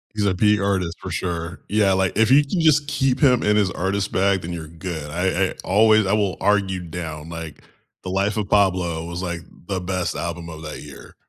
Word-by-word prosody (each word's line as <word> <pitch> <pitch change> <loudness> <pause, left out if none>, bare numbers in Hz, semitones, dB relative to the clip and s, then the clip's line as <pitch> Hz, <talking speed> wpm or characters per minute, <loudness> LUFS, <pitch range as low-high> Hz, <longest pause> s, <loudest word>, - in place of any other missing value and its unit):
He's 105 -1 0
a 95 - +1
peak 105 +2 +3
artist 95 -4 -1
for - - -7
sure. 85 0 -3
Yeah, 100 -2 +3
like, 95 0 +1
if 110 0 +4
you 140 +3 +6
can 165 +4 -1
just 150 -2 +4
keep 135 -3 0
him 130 -5 +4
in 105 0 +2
his 100 -3 +2
artist 95 +2 -2
bag, 95 0 +2
then 85 +1 -5
you're 80 -2 -6
good. 80 -2 -6
I 95 +3 0
I - - -6
always 110 +2 +4
I 95 - +1
will 100 -3 +1
argue 100 -2 +1
down, 80 -2 -6
like, 80 -2 -8 0.4
The 95 - -5
Life 100 +3 0
of 105 - -1
Pablo 90 -5 +2
was, 85 +2 -5
like, 85 -1 -3 0.3
the 95 -2 -2
best 90 -1 -2
album 85 0 -4
of 80 -1 -9
that 75 -1 -7
year. - - -12
95 Hz, 220 wpm, -22 LUFS, 85-105 Hz, 0.4 s, you